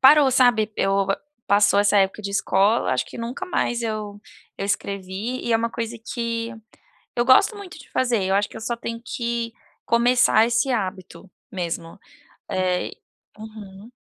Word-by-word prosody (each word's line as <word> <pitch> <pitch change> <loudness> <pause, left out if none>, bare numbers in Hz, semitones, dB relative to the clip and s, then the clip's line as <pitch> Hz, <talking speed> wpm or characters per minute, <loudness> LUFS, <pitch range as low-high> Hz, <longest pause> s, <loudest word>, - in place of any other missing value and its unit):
parou, 275 0 +7
sabe. 240 -4 +3
Eu 195 0 +1 0.4
passou 205 0 +5
essa 205 0 +3
época 195 +2 +2
de 200 - -4
escola, 200 - +2
acho 125 0 0
que - - -10
nunca 240 +9 -4
mais 240 -10 -1
eu 215 -2 -4 0.4
eu 195 - -3
escrevi, 200 +4 -3
e 235 - 0
é - - +5
uma 230 0 -1
coisa 230 0 -4
que 230 0 -4 0.6
eu 240 - +2
gosto 330 - +5
muito 390 -5 -10
de - - -14
fazer, 240 -6 +1
eu 190 +1 0
acho 205 +1 +2
que - - -15
eu - - -9
só 235 +1 -2
tenho 230 0 -5
que 235 -1 -3 0.3
começar 235 -1 +4
esse 240 +3 +1
hábito 190 -3 -4 0.2
mesmo, 170 -1 -5 0.5
eh 185 -1 0 0.5
Uhum. 215 0 -11
220 Hz, 160 wpm, -23 LUFS, 200-240 Hz, 0.6 s, parou